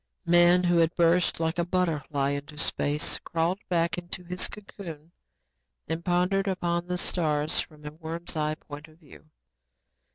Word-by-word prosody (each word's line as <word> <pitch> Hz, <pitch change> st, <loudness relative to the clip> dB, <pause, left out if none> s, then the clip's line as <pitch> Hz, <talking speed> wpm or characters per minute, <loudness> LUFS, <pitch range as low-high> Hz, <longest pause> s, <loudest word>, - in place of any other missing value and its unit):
Man, 175 Hz, +1 st, +6 dB
who 175 Hz, -1 st, +3 dB
had 165 Hz, 0 st, +3 dB
burst 170 Hz, 0 st, +3 dB
like 160 Hz, +1 st, -1 dB
a -, -, +3 dB
butterfly 155 Hz, -6 st, 0 dB
into 145 Hz, +1 st, -5 dB
space, 145 Hz, 0 st, +1 dB
crawled 170 Hz, +3 st, -1 dB
back 170 Hz, 0 st, +1 dB
into 175 Hz, 0 st, -7 dB
his 180 Hz, +1 st, -1 dB
cocoon 170 Hz, -6 st, -10 dB, 0.8 s
and 160 Hz, +2 st, -3 dB
pondered 180 Hz, +2 st, +1 dB
upon 175 Hz, -2 st, -1 dB
the 180 Hz, 0 st, -1 dB
stars 155 Hz, -4 st, +1 dB
from 150 Hz, -1 st, -6 dB
a 150 Hz, -, -5 dB
worm's 165 Hz, +2 st, -5 dB
eye 155 Hz, 0 st, 0 dB
point 150 Hz, 0 st, -10 dB
of 155 Hz, 0 st, -20 dB
view. 155 Hz, -1 st, -17 dB
170 Hz, 155 wpm, -27 LUFS, 155-175 Hz, 0.8 s, Man